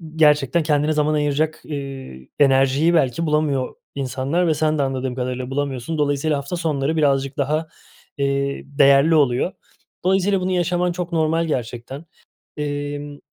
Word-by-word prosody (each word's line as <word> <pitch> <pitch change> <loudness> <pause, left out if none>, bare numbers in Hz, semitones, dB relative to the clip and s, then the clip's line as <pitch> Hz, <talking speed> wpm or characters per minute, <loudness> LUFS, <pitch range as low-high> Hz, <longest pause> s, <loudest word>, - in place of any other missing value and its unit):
gerçekten 150 0 +3
kendine 150 0 +1
zaman 150 0 +1
ayıracak, 150 +1 0
iii, 135 - -7
enerjiyi 135 +4 +4
belki 160 +1 +1
bulamıyor 150 -4 0 0.2
insanlar 140 +6 -1
ve 160 - +3
sen 155 0 0
de - - +1
anladığım 130 -1 -2
kadarıyla 125 0 -3
bulamıyorsun. 140 +2 -3
Dolayısıyla 145 +1 +1
hafta 140 +5 -4
sonları 155 -3 -1
birazcık 135 -2 +1
daha, 155 +3 0 0.5
iii, 140 0 -1
değerli 140 +3 +5
oluyor. 140 +4 +2 0.5
Dolayısıyla 190 0 +2
bunu 185 +1 -1
yaşaman 180 0 +1
çok 175 0 -4
normal 165 0 +1
gerçekten, 130 +1 -4 0.5
iii, 145 0 -4
145 Hz, 135 wpm, -21 LUFS, 135-160 Hz, 0.5 s, değerli